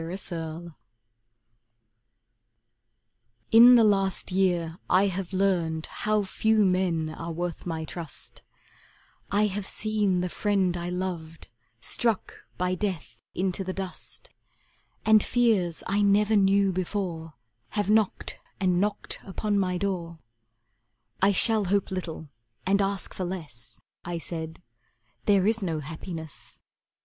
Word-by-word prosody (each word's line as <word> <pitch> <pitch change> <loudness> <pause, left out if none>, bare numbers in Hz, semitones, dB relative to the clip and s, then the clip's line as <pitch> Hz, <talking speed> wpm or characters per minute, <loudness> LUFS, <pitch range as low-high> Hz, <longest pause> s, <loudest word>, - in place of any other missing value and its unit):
Red 175 +4 -5
Maples 165 0 -5 2.8
In 240 +2 +9
the 235 - +6
last 195 -3 +2
year 175 -3 +1
I 185 +2 +5
have 190 -1 -3
learned 175 -5 +1
How 215 -1 0
few 215 +2 +2
men 180 -4 +1
are 165 +2 -6
worth 175 +1 -4
my 160 -2 -3
trust; 165 -1 -8 0.9
I 205 +2 +3
have 205 -1 -3
seen 210 -4 +1
the 180 - -1
friend 190 -1 +1
I 175 0 -3
loved 180 -3 -5 0.3
Struck 230 - 0 0.2
by 180 0 0
death 185 - -3 0.2
into 190 +1 0
the 185 0 -4
dust, 190 -1 -5 0.7
And 220 -1 +6
fears 215 -9 +1
I 200 +2 +1
never 205 +2 +4
knew 195 -1 +4
before 175 -4 -3 0.4
Have 205 0 +1
knocked 215 -2 +1 0.2
and 180 -2 +2
knocked 205 0 -2
upon 205 +1 -1
my 180 -2 0
door 175 -3 -3 1.0
"I 195 +2 +5
shall 215 +2 +4
hope 200 +1 0
little 170 -4 -5 0.4
and 200 +1 +3
ask 195 -1 -1
for 185 - -4
less," 145 - -6 0.2
I 175 -1 -3
said, 165 0 -5 0.6
"There 200 -2 +4
is 225 +1 +2
no 165 -5 -1
happiness." 160 +1 -8
185 Hz, 125 wpm, -27 LUFS, 170-200 Hz, 2.8 s, In